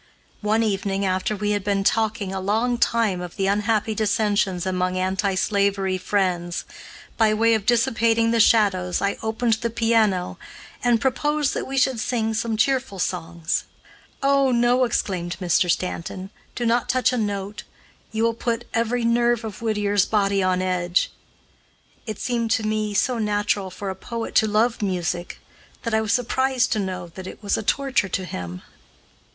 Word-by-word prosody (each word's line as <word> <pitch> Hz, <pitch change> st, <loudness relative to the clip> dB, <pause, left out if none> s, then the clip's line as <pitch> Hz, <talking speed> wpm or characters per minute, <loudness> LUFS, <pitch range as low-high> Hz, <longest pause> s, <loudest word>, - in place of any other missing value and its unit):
One 215 Hz, +2 st, +2 dB
evening, 195 Hz, -2 st, -1 dB
after 185 Hz, +3 st, 0 dB
we 210 Hz, +1 st, -1 dB
had 205 Hz, -2 st, 0 dB
been 200 Hz, -1 st, 0 dB
talking 215 Hz, -2 st, 0 dB
a 190 Hz, -, -2 dB
long 225 Hz, +5 st, 0 dB
time 220 Hz, -8 st, +1 dB
of 180 Hz, -1 st, -7 dB
the 195 Hz, -, -1 dB
unhappy 210 Hz, +2 st, +1 dB
dissensions 205 Hz, -4 st, 0 dB
among 185 Hz, 0 st, -1 dB
anti 190 Hz, +1 st, 0 dB
slavery 195 Hz, -1 st, +1 dB
friends, 180 Hz, -3 st, -1 dB, 0.5 s
by 220 Hz, -2 st, +3 dB
way 230 Hz, +1 st, +3 dB
of 215 Hz, -2 st, -1 dB
dissipating 230 Hz, -1 st, +3 dB
the 230 Hz, -, +2 dB
shadows 195 Hz, -5 st, +3 dB
I 200 Hz, -, -1 dB
opened 225 Hz, +1 st, 0 dB
the 235 Hz, -, 0 dB
piano, 225 Hz, -5 st, +1 dB, 0.4 s
and 240 Hz, -2 st, +3 dB
proposed 295 Hz, +3 st, 0 dB
that -, -, -3 dB
we 270 Hz, +1 st, -4 dB
should 260 Hz, -2 st, +2 dB
sing 225 Hz, -1 st, -1 dB
some 225 Hz, 0 st, -1 dB
cheerful 260 Hz, -3 st, +1 dB
songs. 170 Hz, -2 st, -2 dB, 0.6 s
"Oh, 275 Hz, -1 st, +4 dB
no!" 245 Hz, +1 st, +3 dB
exclaimed 180 Hz, -6 st, -2 dB
Mr. 180 Hz, -1 st, +2 dB
Stanton, 185 Hz, +2 st, -2 dB, 0.2 s
"do 240 Hz, -, -2 dB
not 235 Hz, +1 st, +1 dB
touch 255 Hz, -1 st, +2 dB
a -, -, 0 dB
note; 205 Hz, -1 st, -3 dB, 0.5 s
you 220 Hz, +1 st, -1 dB
will 230 Hz, 0 st, +2 dB
put 235 Hz, 0 st, -2 dB
every 230 Hz, +1 st, 0 dB
nerve 235 Hz, 0 st, +2 dB
of 220 Hz, -2 st, -7 dB
Whittier's 205 Hz, -3 st, +1 dB
body 200 Hz, -2 st, +2 dB
on 185 Hz, 0 st, +1 dB
edge." 180 Hz, -1 st, 0 dB, 1.0 s
It 215 Hz, -2 st, -4 dB
seemed, 235 Hz, -2 st, -1 dB
to 220 Hz, -, 0 dB
me, 215 Hz, -1 st, -1 dB
so 245 Hz, +3 st, +1 dB
natural 205 Hz, -2 st, 0 dB
for 195 Hz, +1 st, -5 dB
a -, -, -6 dB
poet 230 Hz, +4 st, -5 dB
to 220 Hz, -, +4 dB
love 220 Hz, +3 st, +1 dB
music 180 Hz, -3 st, -2 dB, 0.4 s
that 230 Hz, -, -2 dB
I 220 Hz, -, +3 dB
was 215 Hz, -2 st, -1 dB
surprised 255 Hz, +1 st, +1 dB
to 220 Hz, -, +1 dB
know 185 Hz, -3 st, -4 dB
that 185 Hz, +2 st, -9 dB
it -, -, -10 dB
was 200 Hz, -, +1 dB
a -, -, -2 dB
torture 260 Hz, -2 st, 0 dB
to 185 Hz, +1 st, -2 dB
him. 90 Hz, -, -6 dB
210 Hz, 170 wpm, -23 LUFS, 190-230 Hz, 1.0 s, Oh